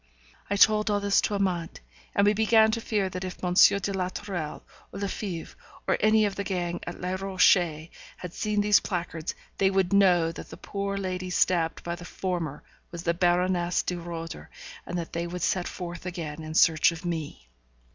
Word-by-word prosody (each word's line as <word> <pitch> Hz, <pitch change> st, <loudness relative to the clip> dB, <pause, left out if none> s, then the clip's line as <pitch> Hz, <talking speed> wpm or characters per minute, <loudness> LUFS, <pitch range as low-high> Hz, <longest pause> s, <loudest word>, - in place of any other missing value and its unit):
I 200 Hz, -, +1 dB
told 215 Hz, +1 st, +5 dB
all 205 Hz, -1 st, +2 dB
this 200 Hz, 0 st, +3 dB
to 210 Hz, -, -1 dB
Amante, 180 Hz, -4 st, -1 dB, 0.4 s
and 200 Hz, -, +4 dB
we 205 Hz, -, +5 dB
began 220 Hz, +1 st, +4 dB
to 230 Hz, +1 st, -2 dB
fear 210 Hz, -4 st, 0 dB
that 185 Hz, 0 st, -5 dB
if 185 Hz, 0 st, -7 dB
M. 180 Hz, -1 st, 0 dB
de 200 Hz, +1 st, +5 dB
la 185 Hz, -1 st, -1 dB
Tourelle, 185 Hz, -6 st, -5 dB, 0.3 s
or 195 Hz, -, -7 dB
Lefebvre, 195 Hz, -3 st, -4 dB, 0.3 s
or -, -, +3 dB
any 215 Hz, 0 st, +4 dB
of 200 Hz, -, -1 dB
the 200 Hz, -, -4 dB
gang 175 Hz, -3 st, -2 dB
at 175 Hz, -, -6 dB
Les 180 Hz, +1 st, -2 dB
Rochers, 175 Hz, -4 st, +3 dB, 0.3 s
had 180 Hz, -2 st, -8 dB
seen 210 Hz, -1 st, 0 dB
these 205 Hz, 0 st, +5 dB
placards, 170 Hz, -3 st, -4 dB, 0.2 s
they 195 Hz, -, +4 dB
would 190 Hz, -1 st, +1 dB
know 180 Hz, -4 st, +4 dB
that -, -, -9 dB
the -, -, -10 dB
poor 200 Hz, 0 st, -4 dB
lady 185 Hz, -1 st, -3 dB
stabbed 170 Hz, -2 st, +1 dB
by 170 Hz, -, -3 dB
the 175 Hz, 0 st, -8 dB
former 175 Hz, -5 st, -4 dB, 0.3 s
was 170 Hz, -1 st, -7 dB
the 170 Hz, -, +1 dB
Baroness 175 Hz, 0 st, +1 dB
de 180 Hz, -, -2 dB
Roeder, 165 Hz, -1 st, -7 dB, 0.4 s
and 180 Hz, -, -3 dB
that 170 Hz, -1 st, -5 dB
they 170 Hz, +1 st, -2 dB
would 180 Hz, +1 st, -5 dB
set 180 Hz, -2 st, 0 dB
forth 175 Hz, 0 st, -7 dB
again 165 Hz, -4 st, -5 dB
in 155 Hz, 0 st, -7 dB
search 160 Hz, 0 st, +5 dB
of 165 Hz, +1 st, -9 dB
me. 155 Hz, -, -4 dB
180 Hz, 195 wpm, -27 LUFS, 170-200 Hz, 0.4 s, told